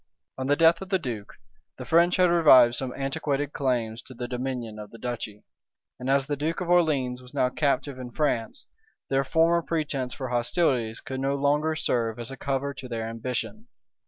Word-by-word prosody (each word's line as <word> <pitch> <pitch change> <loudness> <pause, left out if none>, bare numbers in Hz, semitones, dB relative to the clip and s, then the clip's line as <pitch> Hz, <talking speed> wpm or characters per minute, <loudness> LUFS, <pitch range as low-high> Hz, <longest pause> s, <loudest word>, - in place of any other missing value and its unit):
On 130 0 -4
the 145 - +4
death 165 +2 +4
of 190 - -7
the 190 - +3
duke, 120 - -6 0.4
the 125 - -7
French 170 +6 +4
had 180 -1 +4
revived 130 -8 +7
some 125 +1 -3
antiquated 140 +1 -2
claims 120 -4 -1
to 130 - -12
the 120 +1 -4
dominion 125 -3 -4
of 105 -1 -8
the 115 - -12
duchy; 115 -4 -5 0.6
and 125 - -4
as 135 0 +3
the 145 +1 -2
duke 155 +4 -2
of 180 -2 -4
Orleans 140 -8 +2
was 125 0 -14
now 125 - +2
captive 140 -1 -1
in 125 -1 -6
France, 120 -4 -1 0.4
their 135 0 +2
former 165 +4 +3
pretence 145 -6 -2
for 130 -3 -5
hostilities 120 -2 0
could 130 0 -5
no 135 +1 0
longer 145 +3 +1
serve 115 -6 -1
as 120 +2 -5
a - - -6
cover 140 +1 -2
to 130 - -9
their 115 -2 -3
ambition. 125 - -4
135 Hz, 190 wpm, -26 LUFS, 120-150 Hz, 0.6 s, revived